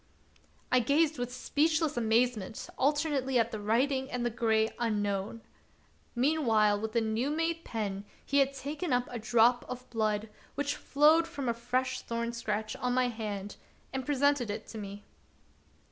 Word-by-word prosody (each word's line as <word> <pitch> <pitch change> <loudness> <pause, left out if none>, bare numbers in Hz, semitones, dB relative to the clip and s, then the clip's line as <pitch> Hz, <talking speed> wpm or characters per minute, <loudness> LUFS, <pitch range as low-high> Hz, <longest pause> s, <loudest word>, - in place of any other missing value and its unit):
I 255 - +5
gazed 290 +5 +2
with 245 0 -3
speechless 305 +4 +1
amazement 225 -2 0
alternately 280 -2 +1
at 230 0 +2
the 215 - -4
writing 260 +6 +1
and 245 -1 -2
the 240 - 0
gray 220 -1 +1
Unknown. 205 -1 -1 0.7
Mean 300 +6 +2
while 210 -2 +4
with 220 +1 -4
a 230 - +4
new 220 +4 0
made 330 +2 -1
pen 205 -3 -4 0.2
he 280 - +2
had 275 0 +3
taken 290 +3 -3
up 245 0 +1
a 240 - -4
drop 235 +2 +4
of 250 0 -7
blood 215 -2 0 0.3
which 285 0 -1
flowed 310 +4 +4
from 285 -6 -5
a 235 - +2
fresh 255 +2 -1
thorn 235 0 -3
scratch 215 -2 -3
on 250 0 -1
my 255 -1 +2
hand, 210 -3 -5 0.4
and 265 0 -2
presented 285 -3 +2
it 205 - -4
to 225 - -7
me. 200 0 -8
245 Hz, 160 wpm, -30 LUFS, 220-280 Hz, 0.7 s, I